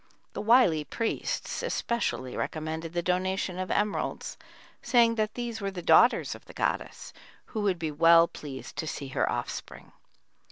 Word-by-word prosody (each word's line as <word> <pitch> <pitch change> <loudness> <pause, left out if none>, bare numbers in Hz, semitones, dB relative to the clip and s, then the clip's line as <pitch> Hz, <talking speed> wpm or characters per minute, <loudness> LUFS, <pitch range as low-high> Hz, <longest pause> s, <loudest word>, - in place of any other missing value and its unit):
The - - -4
wily 210 -9 +4
priests 225 - -3
especially 235 - -2
recommended 160 +1 -4
the 175 0 -1
donation 185 +1 -1
of 185 - -3
emeralds, 205 0 -1 0.5
saying 235 -2 +4
that 215 -1 -1
these 235 -2 -4
were 200 - -1
the 185 -3 -7
daughters 240 +8 +5
of - - -12
the - - -13
goddess, - - -3 0.3
who 220 - -4
would 195 -3 +1
be 160 -2 -3
well 165 +2 +6
pleased 140 -5 -9
to 160 - -3
see 140 -2 -5
her - - 0
offspring. - - -5
185 Hz, 155 wpm, -28 LUFS, 160-220 Hz, 0.5 s, well